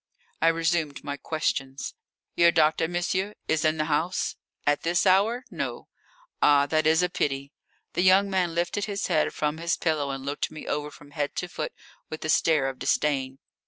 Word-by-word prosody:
I 165 - +4
resumed 165 -3 +1
my 145 -1 -3
questions: 140 -3 -3 0.4
"Your 170 0 +6
doctor, 160 0 +3
monsieur, 185 +4 -1
is 160 - +1
in 155 0 +2
the 155 - 0
house?" 160 +4 0 0.3
"At 145 0 +2
this 175 +3 +1
hour? 205 +7 +3
No." - - -5 0.5
"Ah. 145 -1 +5
That 155 +1 +1
is 160 +3 +4
a - - +3
pity." 140 -4 -2 0.4
The - - +1
young 190 +2 +5
man 185 -4 0
lifted 175 +4 0
his 200 -2 -3
head 155 - +1
from 150 +1 -2
his 170 0 0
pillow 155 -4 0
and 135 0 -5
looked 145 +1 -2
me 155 - -9
over 150 0 -2
from 145 0 -15
head 145 -1 -3
to 180 - -2
foot - - -5 0.4
with 155 0 -6
a - - -3
stare 150 -2 +3
of 135 -1 -5
disdain. 135 -3 0
155 Hz, 185 wpm, -26 LUFS, 145-175 Hz, 0.5 s, Your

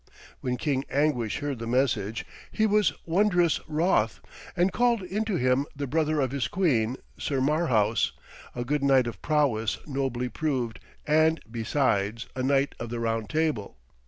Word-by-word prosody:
When 125 -1 -2
King 135 -2 0
Anguish 140 -5 0
heard 140 -4 -3
the 115 - -5
message 115 -5 0 0.3
he 220 - +1
was 210 -1 +3
wondrous 175 -1 +3
wroth, 150 - +1 0.4
and 180 +2 +2
called 240 -3 +2
into 205 +3 -2
him 130 0 +2
the 140 0 -3
brother 155 +2 +1
of 130 -3 +1
his 135 -4 -1
queen, 130 - +1 0.2
Sir 140 -2 -1
Marhaus, 130 -7 +2 0.4
a 120 0 -3
good 145 +3 0
knight 135 -2 +4
of 115 -6 -6
prowess 135 -8 +1
nobly 135 -3 -2
proved, 125 -4 -2 0.3
and, 155 +1 +3
besides, 115 -2 0
a 130 - -2
knight 135 +1 +2
of 120 - -5
the 120 0 -4
Round 115 -2 -1
Table. 155 - -1
135 Hz, 155 wpm, -27 LUFS, 115-155 Hz, 0.4 s, knight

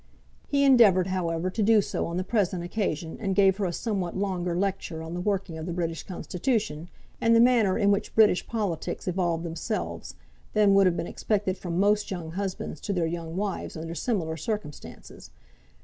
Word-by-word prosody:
He 280 -1 +2
endeavoured, 225 -9 +6
however, 180 -1 -1
to 220 - -2
do 215 +1 +5
so 200 - -2
on 170 +1 -3
the 185 - 0
present 185 -4 0
occasion, 175 -4 -3
and 195 -4 -1
gave 195 -1 +4
her 205 - -1
a 175 - -1
somewhat 190 -2 -3
longer 180 -3 -1
lecture 185 -4 -2
on 160 +1 -7
the 175 - -3
working 195 -4 -2
of 160 - -6
the 175 - -3
British 165 -2 -2
Constitution, 180 - -2 0.3
and 230 0 +4
the - - +6
manner 235 -5 +4
in 200 0 +3
which 200 +1 -1
British 215 -5 +4
politics 205 -9 -3
evolved 175 -2 0
themselves, 85 - -4 0.4
than 210 -2 +4
would 195 -1 +6
have 175 - +1
been - - -2
expected 195 0 -1
from 175 -2 -3
most 205 +1 +2
young 170 -4 -5
husbands 185 -4 -4
to 200 - -2
their 175 -3 +1
young 165 0 -4
wives 200 -4 -3
under 165 +1 -5
similar 170 -3 -2
circumstances. 185 -3 -6
185 Hz, 185 wpm, -27 LUFS, 170-205 Hz, 0.4 s, endeavoured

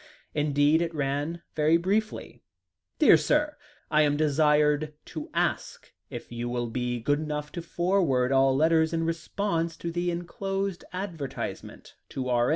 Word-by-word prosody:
Indeed, 145 +1 +3
it 165 -1 -2
ran 145 +4 -2
very 155 +2 +4
briefly: 205 +5 -2 0.6
"DEAR - - +7
SIR, 300 0 +1 0.4
I 155 0 +5
am 145 -1 +2
desired 150 0 +2 0.2
to - - -6
ask - - -2 0.2
if - - -8
you 120 0 -4
will 120 0 -2
be 125 0 -2
good 145 +6 +1
enough 150 -1 -4
to 170 - -5
forward 170 -8 +1
all 135 0 +4
letters 160 +2 +3
in 165 0 0
response 165 +1 -2
to 170 - -4
the 175 +1 -1
enclosed 195 +2 -3
advertisement 175 -7 -6 0.2
to 130 -1 -4
R. 120 0 +2
155 Hz, 145 wpm, -27 LUFS, 145-170 Hz, 0.6 s, DEAR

